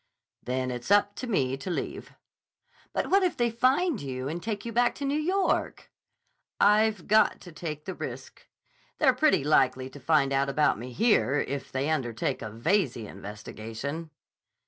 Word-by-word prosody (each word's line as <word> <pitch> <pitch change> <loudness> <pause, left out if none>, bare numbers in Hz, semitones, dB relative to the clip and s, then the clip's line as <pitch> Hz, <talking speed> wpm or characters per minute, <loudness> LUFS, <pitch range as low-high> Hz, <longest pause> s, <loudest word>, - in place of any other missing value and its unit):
"Then 130 0 -2
it's 120 +4 -6
up 205 0 +4
to 255 - -5
me 135 - +1
to 135 - -6
leave." 175 - -4 0.8
"But - - -2
what 395 +1 +5
if 365 -2 0
they 240 -1 +1
find 260 - +2
you 130 -1 -4
and 165 +4 -4
take 210 0 -4
you 235 - -4
back 240 +1 +2
to 280 - -4
New 275 - 0
York?" 375 +5 0 0.7
"I've 210 -2 +3
got 215 +1 +4
to 175 - -11
take 155 -2 -6
the 190 - -4
risk. - - -8 0.5
They're 265 -4 +4
pretty 280 - +3
likely 130 -3 +2
to 145 - -11
find 140 -1 +2
out 135 +1 +1
about 150 -4 +2
me 125 +2 -7
here 145 - +2
if 140 0 -5
they 135 +2 -1
undertake 120 -7 -1
a 110 - -5
Veyze 125 - 0
investigation." 110 - -7
155 Hz, 170 wpm, -28 LUFS, -, 0.8 s, what